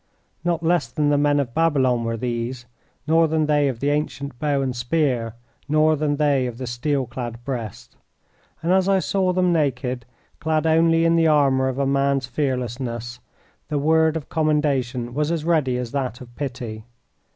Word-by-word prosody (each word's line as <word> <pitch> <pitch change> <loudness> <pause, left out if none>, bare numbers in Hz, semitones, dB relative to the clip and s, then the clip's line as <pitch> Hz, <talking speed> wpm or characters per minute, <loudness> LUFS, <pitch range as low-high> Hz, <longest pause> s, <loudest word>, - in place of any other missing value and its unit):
Not 170 -1 0
less 165 -6 +2
than 145 +4 0
the 145 - +3
men 145 0 +3
of 125 -4 -2
Babylon 135 -7 +2
were 115 0 -2
these, 120 +1 -3 0.4
nor 165 +2 +4
than 155 0 +1
they 150 -1 +2
of 125 -4 -3
the 145 +1 +1
ancient 140 -3 -3
bow 145 -2 0
and 130 -2 -2
spear, 120 -3 0 0.3
nor 155 +1 +4
than 150 -1 0
they 140 -3 +2
of 120 -2 -7
the 130 - -5
steel 130 +3 -1
clad 120 -2 -6
breast; 120 -7 -6 0.7
and 170 - +1
as 190 0 +3
I 195 - +4
saw 190 0 +1
them 180 -1 +2
naked, 130 -5 -1 0.3
clad 155 +1 0
only 165 +1 +4
in 165 0 +3
the 165 -1 +4
armor 135 -3 +3
of 130 0 -2
a 140 - +1
man's 140 0 +1
fearlessness, 125 -2 -3 0.5
the 150 - -2
word 160 +2 +3
of 155 - -8
commendation 140 -6 0
was 150 +3 0
as 160 -2 -2
ready 150 -7 +2
as 125 -2 -4
that 130 -4 -3
of 120 -2 -13
pity. 120 -6 -5
140 Hz, 180 wpm, -22 LUFS, 125-155 Hz, 0.7 s, nor